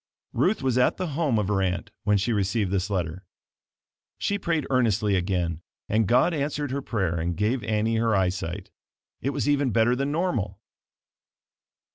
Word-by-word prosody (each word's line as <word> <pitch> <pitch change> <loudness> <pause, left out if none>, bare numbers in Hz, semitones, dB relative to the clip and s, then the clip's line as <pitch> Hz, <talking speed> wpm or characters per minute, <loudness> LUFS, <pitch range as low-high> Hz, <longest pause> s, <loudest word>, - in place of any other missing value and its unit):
Ruth 160 - +1
was 130 -1 +2
at 125 - +3
the 185 -2 -2
home 145 -5 +1
of 105 -3 0
her 100 -1 +1
aunt 90 -2 -2
when 105 0 +4
she 105 +5 0
received 100 -1 0
this 100 0 0
letter. 90 -2 -2 0.9
She 200 0 -1
prayed 165 -5 0
earnestly 110 -5 +2
again 90 -3 -1 0.3
and 110 -1 +2
God 125 - +4
answered 145 -1 -2
her 140 +1 -2
prayer 95 -10 -1
and 85 +1 -2
gave 115 +5 0
Annie 110 +1 0
her 115 -1 +2
eyesight. 90 0 -2 0.5
It 135 - 0
was 140 -4 -2
even 145 -2 +2
better 115 +2 +3
than 140 +2 -1
normal. 125 - -1
110 Hz, 165 wpm, -26 LUFS, 95-135 Hz, 0.9 s, when